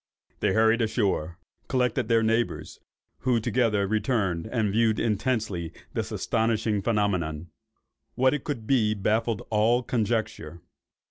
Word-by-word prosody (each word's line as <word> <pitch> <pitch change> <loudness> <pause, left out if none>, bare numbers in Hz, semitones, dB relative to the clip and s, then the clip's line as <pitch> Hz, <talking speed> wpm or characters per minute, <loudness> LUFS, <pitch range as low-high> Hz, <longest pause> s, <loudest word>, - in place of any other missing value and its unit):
They - - +1
hurried 110 +1 +3
ashore, 95 -8 0 0.3
collected 125 -2 0
their 115 -1 +3
neighbours, 115 +1 -1 0.4
who 125 -2 +1
together 110 -3 +1
returned 105 -4 0
and 110 -3 0
viewed 110 0 +2
intensely 105 -6 -1 0.2
this - - -3
astonishing 110 -2 0
phenomenon. 90 -7 -1 0.6
What 130 +2 +3
it 150 - -3
could 130 -7 -4
be, 110 -4 +2
baffled 110 +3 0
all 115 +3 +3
conjecture. 110 -8 -2
110 Hz, 120 wpm, -26 LUFS, 100-120 Hz, 0.6 s, hurried